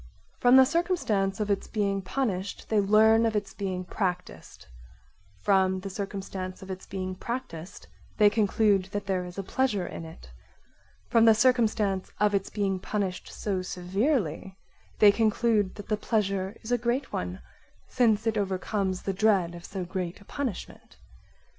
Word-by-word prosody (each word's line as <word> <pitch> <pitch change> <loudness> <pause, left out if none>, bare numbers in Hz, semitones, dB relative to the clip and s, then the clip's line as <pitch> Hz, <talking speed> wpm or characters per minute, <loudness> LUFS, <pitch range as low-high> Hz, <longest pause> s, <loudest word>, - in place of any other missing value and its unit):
From 245 +1 +6
the 265 0 +9
circumstance 260 - 0
of 210 -1 0
its 200 - -1
being 200 -2 -1
punished 195 -2 -3
they 215 - +3
learn 215 +3 +5
of 225 -1 +1
its 200 -2 -2
being 190 -2 -3
practised, 180 -2 -4 0.8
from 190 -1 +3
the 195 +1 -6
circumstance 195 -1 -5
of 190 - -7
its 185 0 -8
being 185 -1 -4
practised 185 -5 -6 0.3
they 210 - +6
conclude 205 -2 +2
that 205 0 -3
there 190 -2 -1
is 180 +1 -10
a 195 - -3
pleasure 210 -3 0
in 165 - -7
it; 160 - -12 0.8
from 230 -1 +4
the 225 -1 +7
circumstance 215 -5 +2
of 210 0 +3
its 195 -1 0
being 195 -3 -1
punished 190 -2 -3
so 195 -3 -3
severely 190 - -1 0.4
they 210 -1 +7
conclude 215 -2 +1
that 205 - -9
the 215 - 0
pleasure 200 -2 -1
is 220 - -6
a 245 - +2
great 245 +4 -1
one, 90 +1 -3 0.5
since 225 -3 +2
it 220 -2 +1
overcomes 190 -1 -2
the 195 - -1
dread 195 -4 +2
of 170 0 -10
so 190 -2 -5
great 180 -1 -4
a 200 - -17
punishment. 265 -6 -6
200 Hz, 160 wpm, -27 LUFS, 185-220 Hz, 0.8 s, the